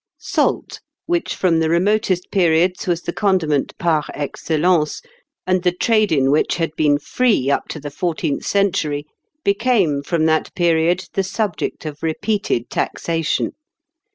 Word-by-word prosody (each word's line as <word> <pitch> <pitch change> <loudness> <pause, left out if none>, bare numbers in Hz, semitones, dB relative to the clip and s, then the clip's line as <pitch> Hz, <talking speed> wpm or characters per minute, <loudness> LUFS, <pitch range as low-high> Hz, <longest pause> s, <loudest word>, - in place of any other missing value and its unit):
Salt, - - -1 0.2
which 345 -1 -1
from 170 -3 +2
the 160 -1 +1
remotest 185 +1 +1
periods 180 -1 +2
was 175 -1 0
the 170 - -3
condiment 170 -9 0
par 160 -3 +1
excellence, 155 +2 0 0.5
and 185 0 +1
the 180 0 +2
trade 215 +3 +2
in 135 -3 +3
which 150 - +2
had 165 -2 -1
been 150 -2 +3
free 150 - +1
up - - 0
to 155 - -6
the 145 0 -7
fourteenth 155 -2 -2
century, 170 -8 0 0.4
became, 200 - +2
from 160 +2 0
that 160 -1 +1
period, 170 +1 +2
the 195 - +1
subject 195 -3 -3
of 150 -1 -6
repeated 165 - -1
taxation. 165 -2 -1
170 Hz, 140 wpm, -20 LUFS, 155-190 Hz, 0.5 s, in